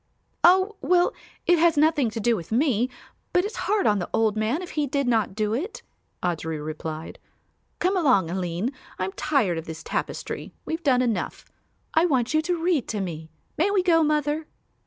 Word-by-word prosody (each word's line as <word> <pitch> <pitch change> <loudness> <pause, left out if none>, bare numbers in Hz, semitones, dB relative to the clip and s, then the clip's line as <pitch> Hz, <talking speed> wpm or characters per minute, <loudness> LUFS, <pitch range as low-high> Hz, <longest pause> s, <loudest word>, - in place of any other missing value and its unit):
"Oh, 380 +4 +5
well, 355 0 +3 0.3
it 350 -1 +4
has 330 -1 +4
nothing 300 -4 +3
to 225 - -5
do 235 +2 +2
with 170 -2 -7
me, 245 -1 +2 0.4
but 360 +1 +3
it's 425 - -5
hard 415 -1 +2
on 210 -1 +3
the 175 - -4
old 220 -2 +2
man 225 +11 0
if 360 - -8
he 300 -2 0
did 280 0 -1
not 220 -5 +1
do 215 0 0
it," 355 - -4 0.4
Audry 160 -2 -1
replied. 155 +1 -6 0.6
"Come 370 +2 +1
along, 250 - +3
Aline; 180 +5 -2 0.3
I'm 185 +1 -2
tired 240 - +1
of 165 - -8
this 160 0 -7
tapestry; - - -4
we've 320 +1 -3
done 255 -5 +3
enough. 230 -4 -2 0.5
I 330 +2 +4
want 255 -4 +1
you 310 - +4
to 340 0 -2
read 335 -8 +1
to 215 - -2
me. 160 -4 -5 0.3
May 355 +5 +3
we 400 -2 +2
go, 335 -3 +4
mother?" 300 0 0
260 Hz, 185 wpm, -25 LUFS, 200-330 Hz, 0.6 s, Oh